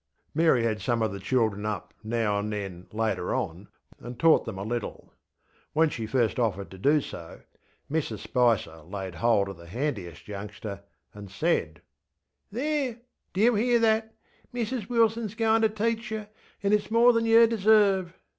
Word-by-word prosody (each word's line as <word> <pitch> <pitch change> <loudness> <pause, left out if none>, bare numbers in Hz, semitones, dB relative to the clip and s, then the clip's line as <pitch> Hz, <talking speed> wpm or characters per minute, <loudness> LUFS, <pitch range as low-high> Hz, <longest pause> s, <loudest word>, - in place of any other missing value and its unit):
ŌĆÖ - - -49
Mary 160 -6 +3
had 110 -3 -1
some 115 +3 0
of 110 - 0
the 100 - -6
children 110 -1 0
up 105 -1 -4
now 110 -2 0
and 105 +1 -3
then 95 -4 -5
later 110 0 -1
on, 90 +5 -4 0.3
and 120 0 -8
taught 165 -1 +5
them 110 -4 -5
a 95 - -4
little. 120 +1 -5 0.6
When 160 +1 +4
she 115 -2 -4
first 120 0 +1
offered 100 -5 -1
to 95 - -11
do 145 +8 +3
so, 85 -9 -9 0.5
Mrs 140 -7 -2
Spicer 115 -7 +1
laid 95 +3 -7
hold 110 0 +2
of 95 - -8
the 85 0 -13
handiest 100 - -4
youngster 100 0 -7 0.3
and 105 -1 -10
saidŌĆö 95 - -1 0.7
ŌĆśThereŌĆödo 270 0 -1 0.4
you 225 +5 +4
hear 240 +3 +3
that? 220 -1 +1 0.4
Mrs 240 -3 -3
Wilson 230 -1 +2
is 210 +1 -7
goinŌĆÖ 225 -1 +3
to 220 - +4 0.2
teach 230 -1 -1
yer, 215 -1 -5 0.3
anŌĆÖ 200 +1 +4
itŌĆÖs - - -12
more 235 +2 +5
than 230 0 +1
yer 230 +1 +7
deserve! 205 -5 +3
125 Hz, 170 wpm, -27 LUFS, -, 0.7 s, yer